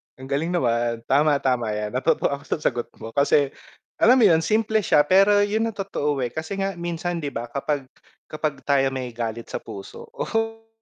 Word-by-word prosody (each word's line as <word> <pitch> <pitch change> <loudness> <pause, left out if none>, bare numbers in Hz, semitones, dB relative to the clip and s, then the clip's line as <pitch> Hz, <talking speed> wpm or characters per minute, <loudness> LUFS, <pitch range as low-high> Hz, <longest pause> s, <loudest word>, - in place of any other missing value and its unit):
Ang 130 +1 -11
galing 160 +5 0
naman. 115 -4 0
Tama, 145 +4 +3
tama 125 -4 +1
yan 105 0 -3
natuto 130 +2 +1
ako 140 - -4
sa - - -1
sagot 120 -1 0
mo 115 - -9
kasi, 140 0 +3 0.5
alam 245 +3 +6
mo 245 - +4
yun? 160 -1 +5
Simple 220 0 +2
siya 155 -6 +4
pero 195 +5 +5
'yun 220 +2 0
ang 225 - -5
totoo, 150 -8 -2
eh, 120 - -1
kasi 160 +7 -5
nga 195 -2 -2
minsan 175 0 -3
'di 145 -3 -4
ba, 120 +1 -5
kapag, 140 -1 -2 0.4
kapag 150 -3 -3
tayo 135 -1 +3
may 130 -2 -4
galit 115 0 -5
sa - - -3
puso 95 -1 -10
oh! 225 0 -2
145 Hz, 195 wpm, -23 LUFS, 125-195 Hz, 0.5 s, alam